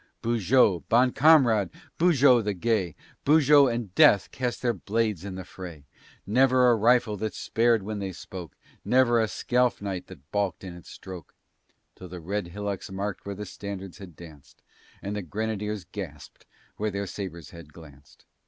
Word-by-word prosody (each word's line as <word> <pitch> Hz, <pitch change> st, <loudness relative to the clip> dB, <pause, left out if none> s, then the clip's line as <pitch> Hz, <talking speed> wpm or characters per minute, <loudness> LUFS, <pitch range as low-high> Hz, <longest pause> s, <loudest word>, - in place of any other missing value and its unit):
Beaujeu, 115 Hz, -3 st, +3 dB
bon 125 Hz, +2 st, +4 dB
camarade! 125 Hz, -, +4 dB, 0.3 s
Beaujeu 140 Hz, -8 st, +5 dB
the 105 Hz, -1 st, -2 dB
Gay! 95 Hz, -3 st, -1 dB, 0.3 s
Beaujeu 145 Hz, -1 st, +5 dB
and 115 Hz, -5 st, -4 dB
Death 100 Hz, -, +5 dB
cast 125 Hz, -1 st, -3 dB
their 120 Hz, -1 st, +2 dB
blades 105 Hz, -1 st, -2 dB
in 100 Hz, -2 st, -6 dB
the 95 Hz, -, -6 dB
fray. 85 Hz, -7 st, -10 dB, 0.4 s
Never 125 Hz, +3 st, +4 dB
a -, -, +4 dB
rifle 115 Hz, -1 st, +2 dB
that 110 Hz, +2 st, -4 dB
spared 115 Hz, -2 st, +1 dB
when 105 Hz, +1 st, -5 dB
they 95 Hz, -1 st, -4 dB
spoke, 90 Hz, -3 st, -9 dB, 0.3 s
Never 120 Hz, -2 st, +3 dB
a 110 Hz, -, +1 dB
scalp 125 Hz, +3 st, 0 dB
knife 95 Hz, -3 st, -5 dB
that 75 Hz, -6 st, -15 dB
balked 100 Hz, -5 st, -1 dB
in 95 Hz, -2 st, -7 dB
its 90 Hz, -, -13 dB
stroke. 90 Hz, -4 st, -11 dB, 0.6 s
Till 90 Hz, -, -11 dB
the 90 Hz, 0 st, -8 dB
red 95 Hz, +3 st, -3 dB
hillocks 100 Hz, +2 st, -5 dB
marked 100 Hz, +1 st, -5 dB
where 100 Hz, -, -4 dB
the 105 Hz, +2 st, -6 dB
standards 95 Hz, -1 st, -8 dB
had 90 Hz, -5 st, -11 dB
danced, 80 Hz, -4 st, -15 dB, 0.4 s
And 100 Hz, +1 st, -4 dB
the 105 Hz, -, -3 dB
Grenadiers 105 Hz, +1 st, -4 dB
gasped 80 Hz, -8 st, -9 dB, 0.3 s
where 110 Hz, +1 st, -1 dB
their 100 Hz, 0 st, -3 dB
sabres 90 Hz, -4 st, -7 dB
had 85 Hz, -3 st, -12 dB
glanced. 75 Hz, -3 st, -17 dB
100 Hz, 165 wpm, -26 LUFS, 90-115 Hz, 0.6 s, Beaujeu